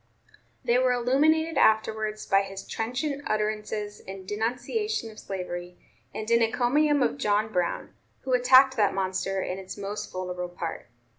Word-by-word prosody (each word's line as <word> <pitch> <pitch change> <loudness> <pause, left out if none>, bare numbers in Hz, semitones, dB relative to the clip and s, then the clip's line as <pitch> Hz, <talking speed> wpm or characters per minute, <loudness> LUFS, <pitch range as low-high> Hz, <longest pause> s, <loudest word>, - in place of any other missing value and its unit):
They 240 +1 +3
were 255 -1 +3
illuminated 300 +6 +2
afterwards 215 0 +2
by 195 -1 +4
his 195 -1 -7
trenchant 270 +6 -2
utterances 210 -1 -2
in 190 0 -9
denunciation 245 - -2
of 215 - -13
slavery 180 -2 -6 0.3
and 215 - -6
in 235 0 +5
encomium 265 +5 +3
of 280 - -1
John 215 -1 +1
Brown, 180 -1 -1 0.3
who 260 - -2
attacked 255 +2 +6
that 205 -3 +2
monster 190 0 -1
in 185 +1 -4
its 190 +1 -8
most 200 +1 -5
vulnerable 180 -1 -4
part. 170 - -6
215 Hz, 145 wpm, -27 LUFS, 195-250 Hz, 0.3 s, attacked